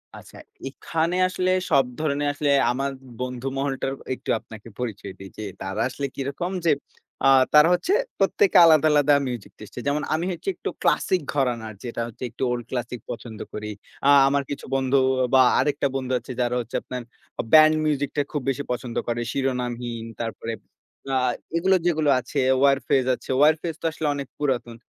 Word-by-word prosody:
আচ্ছা। - - -13 0.3
এখানে 165 +5 -2
আসলে 185 0 0 0.2
সব 135 -1 +4
ধরনের 145 -2 0
আসলে, 145 0 0 0.2
আমার 135 +2 -2 0.3
বন্ধু 125 0 -4
মহলটা 135 -1 -2 0.3
একটু - - -11
আপনাকে 110 0 -13
পরিচয় 100 -5 -5
দেই। 95 - -9
যে, 110 - -5 0.2
তারা 95 +2 -3
আসলে 140 +2 -4
কিরকম? 140 +7 -3
যে, 165 - +5 0.5
আ - - +7 0.2
তারা 150 +1 +8
হচ্ছে 250 - +1 0.3
প্রত্যেকে 415 -3 +3
আলাদা, 155 -1 +6
আলাদা 145 0 +4
মিউজিক 120 -4 -6
টেস্টের। 110 +3 -9
যেমন 145 +1 0
আমি 160 +2 0
হচ্ছে, 180 - -4
একটু - - -4
ক্লাসিক 185 -2 +2
ঘরানা। 125 -5 0 0.2
যেটা 120 -1 -4
হচ্ছে 120 +2 -10
একটু 130 - -6
ওল্ড 120 -1 -2
ক্লাসিক 125 -1 -3
পছন্দ 115 -2 -8
করি। 105 0 -5 0.4
আ - - +6 0.2
আমার 140 0 +1
কিছু 145 - -5
বন্ধু 135 0 +2 0.4
বা 130 - +7 0.2
আরেকটা 145 +1 +1
বন্ধু 130 -1 -3
আছে, - - -10
যারা 120 0 0
হচ্ছে 120 0 -9
আপনার 125 0 -6 0.4
আ - - -9
ব্যান্ড 155 0 +8
মিউজিক 145 -2 0
টা - - +4
খুব 150 - -2
বেশি 135 +1 -2
পছন্দ 125 -1 -4
করে। 120 0 -1
শিরোনামহীন, 125 -3 -2 0.2
তারপরে 115 0 -4 0.6
আ - - +4 0.4
এগুলো 190 +3 +3
যেগুলো 155 -4 +2
আছে, 130 +3 -4 0.2
ওয়ারফেজ 135 -1 +3
আছে, - - -16
ওয়ারফেজ 155 +3 +3
তো - - -6
আসলে 155 0 -3
অনেক 140 -2 -5
পুরাতন। 125 -5 -1
135 Hz, 170 wpm, -24 LUFS, 120-150 Hz, 0.6 s, তারা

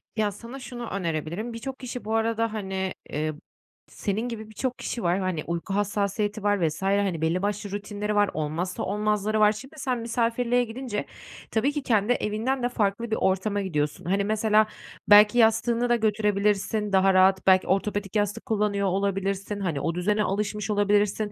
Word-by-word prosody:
Ya, 215 -2 +1
sana 235 +7 -9
şunu 245 -3 -7
önerebilirim, 170 +4 -3
birçok 265 +3 -6
kişi 250 -3 -6
bu 220 +1 -1
arada, 225 0 0
hani 190 -3 -3 0.2
Eee, 155 +1 -2 0.5
senin 200 +1 -3
gibi 220 -2 -7
birçok 250 +4 -3
kişi 235 - -4
var, 175 +2 +2
hani, 185 -5 -2
uyku 170 +3 -3
hassasiyeti 205 +1 -1
var 205 -5 +2
vs. 155 +3 -5
hani, 195 -3 +1
belli 165 +3 +1
başlı 205 0 -2
rutinleri 205 +1 -3
var, 205 -1 +4
olmazsa 160 +4 -3
olmazları 210 +1 0
var. 210 0 +6
Şimdi 265 +8 -9
sen 255 -3 -1
misafirliğe 235 +1 +1
gidince 235 -2 -4 0.5
tabii 240 +6 +2
ki 295 -1 -4
kendi 220 -1 +2
evinden 240 +4 -1
de 245 - +2
farklı 220 0 -1
bir - - +2
ortama 200 +2 0
gidiyorsun. 150 -6 -2
Hani, 195 +3 +1
mesela, 215 +1 +3 0.4
belki 210 +2 +8
yastığını 235 +1 +3
da 240 - +5
götürebilirsin 210 -1 +1
daha 190 0 +5
rahat, 190 0 +4
belki 185 -1 +5
ortopedik 200 +1 -1
yastık 210 +1 0
kullanıyor 205 -2 0
olabilirsin, 195 +1 -1
hani, 165 -8 -2
o 165 - -1
düzene 210 +4 +1
alışmış 210 +1 -2
olabilirsin. 205 0 +1
210 Hz, 165 wpm, -26 LUFS, 195-225 Hz, 0.5 s, belki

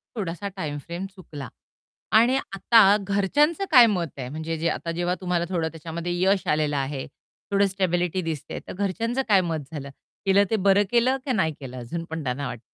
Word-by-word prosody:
थोडासा 195 -1 -4
time 150 -5 -4
frame 175 +3 -5
चुकला. 150 -7 -9 0.6
आणि 240 +4 +5 0.2
आता 205 0 +6
घरच्यांचं 290 - +1
काय 250 -4 +9
मत 180 -6 0
आहे, 125 - -4
म्हणजे 160 +2 -4
जे 165 +2 0
आता 165 - -3
जेव्हा 175 +2 -1
तुम्हाला 175 -1 0
थोडं 170 -3 0
त्याच्यामध्ये 165 +2 -5
यश 195 0 +2
आलेलं 150 -1 +1
आहे. 135 0 -3 0.5
थोडं 200 0 +4
स्टॅबिलिटी 185 -1 0
दिसतेय, 160 -4 -5
तर - - -6
घरच्यांचं 225 +7 -1
काय 195 -2 +6
मत 165 -3 -2
झालं? 140 -3 -6 0.4
केलं 195 +1 +5
ते 220 - +2
बरं 200 0 +4
केलं, 250 +3 +3
की 265 - -1
नाही 165 -9 +1
केलं. 130 -2 -8
अजून 165 +8 -5
पण 160 -1 -4
त्यांना 135 +2 -2
वाट 120 - -6
175 Hz, 185 wpm, -25 LUFS, 160-200 Hz, 0.6 s, काय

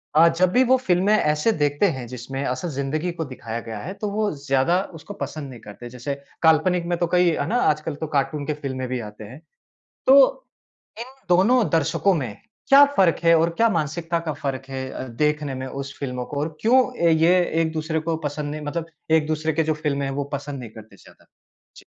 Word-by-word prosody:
अ, 165 +2 +7
जब 175 +2 +1
भी 250 +6 +4
वो 260 - +7
फ़िल्में 195 -4 +2
ऐसे 150 +4 +2
देखते 145 +5 +2
हैं, 125 - -6
जिसमें 130 +3 -6
असल 130 +7 -2
ज़िंदगी 150 +4 -2
को 165 -1 -4
दिखाया 120 -4 -6
गया 110 -2 -5
है, 180 - -6
तो 205 +1 -4
वो 210 0 0
ज़्यादा 140 +7 +2 0.2
उसको 205 - -9
पसंद 150 -3 -8
नहीं 125 -3 -10
करते। 110 +4 -10
जैसे 125 +3 -5 0.3
काल्पनिक 165 +2 +3
में - - 0
तो 175 - +1
कई 180 -1 +5
है - - -2
ना, 235 - -1 0.2
आजकल 155 0 -4
तो 160 - -5
कार्टून 145 +1 -1
के 155 - 0
फ़िल्में 130 -1 -3
भी 125 0 -3
आते 105 +1 -12
हैं। 120 +7 -11 0.7
तो 265 - +8 0.8
इन 235 - -4 0.2
दोनों 205 +8 +4
दर्शकों 165 +4 +2
में 125 -10 -3 0.3
क्या 275 +1 +9
फ़र्क 185 -4 +4
है 165 0 +6
और 165 +1 +2
क्या 230 - +4
मानसिकता 165 -1 -1
का 155 - 0
फ़र्क 135 -2 -4
है 130 -1 -5
अ, 130 - -6
देखने 150 +3 -1
में 130 0 -5
उस 140 +1 -7
फ़िल्मों 125 -3 -4
को, 140 - -5
और 155 +1 -4
क्यों 245 +4 +5 0.3
ये 165 +3 +4 0.3
एक-दूसरे 160 0 -1
को 165 - 0
पसंद 145 0 -5
नहीं 155 +1 -5
मतलब 165 +2 -3 0.2
एक-दूसरे 155 0 +1
की 160 +2 +1
जो 155 0 0
फ़िल्में 145 -2 -2
हैं 135 - -3
वो 145 - -1
पसंद 140 0 -4
नहीं 120 -3 -8
करते 110 0 -14
ज़्यादा? - - -20 0.5
जी। - - -14
155 Hz, 210 wpm, -23 LUFS, 135-170 Hz, 0.8 s, क्या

